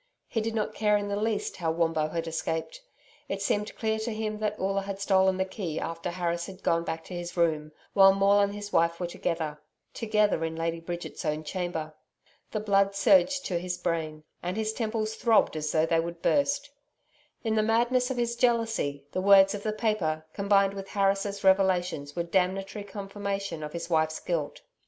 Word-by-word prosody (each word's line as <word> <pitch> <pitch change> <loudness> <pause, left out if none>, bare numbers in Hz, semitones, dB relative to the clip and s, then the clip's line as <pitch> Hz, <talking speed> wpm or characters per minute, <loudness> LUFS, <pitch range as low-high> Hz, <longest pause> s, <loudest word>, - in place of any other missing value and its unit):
He 225 - -1
did 225 +1 -2
not 215 -2 -1
care 210 -1 +3
in 205 0 -3
the 200 - -1
least 215 0 -1
how 170 -3 -1
Wombo 160 -1 +1
had 165 +1 -3
escaped. 165 - -3 0.5
It 195 - -2
seemed 205 +1 -1
clear 220 -1 -1
to 225 +2 -3
him 215 -1 -3
that 210 -1 -2
Oola 195 +1 0
had 195 0 -5
stolen 190 -1 +3
the 190 - +1
key 185 -5 -4
after 165 +1 -4
Harris 170 -1 -2
had 190 0 -11
gone 165 0 +2
back 160 -1 -4
to - - -10
his 175 0 -6
room, 155 -3 +1 0.2
while 195 -1 +8
Maule 195 +1 +4
and 200 0 +1
his 205 0 -7
wife 170 0 +2
were 180 - -1
together 165 -3 -3 0.3
together 210 -6 +1
in 160 0 -2
Lady 165 0 -2
Bridget's 175 +2 -6
own 155 -1 -1
chamber. 160 -1 -4 0.6
The 215 - -2
blood 200 -1 +2
surged 205 +7 +4
to 175 -2 -1
his 180 0 -3
brain, 155 -3 -2 0.2
and 180 +3 -3
his 220 0 -1
temples 220 -1 -2
throbbed 225 -6 +3
as 150 -1 -2
though 155 0 +3
they 165 0 +2
would 170 0 -4
burst. 285 0 +1 0.7
In 225 -2 0
the 220 - +3
madness 240 +3 +2
of 260 - -3
his 235 -1 0
jealousy, 225 - 0
the 185 - -1
words 195 0 +7
of 205 - -4
the 215 - -1
paper, 205 -8 -1
combined 200 -1 +3
with 195 -1 -7
Harris' 200 0 0
revelations 180 -6 +2
were 170 - 0
damnatory 190 +3 -1
confirmation 200 -3 -4
of 150 0 -5
his 170 -1 -4
wife's 160 -2 +1
guilt. 160 -5 -3
195 Hz, 195 wpm, -28 LUFS, 165-210 Hz, 0.7 s, while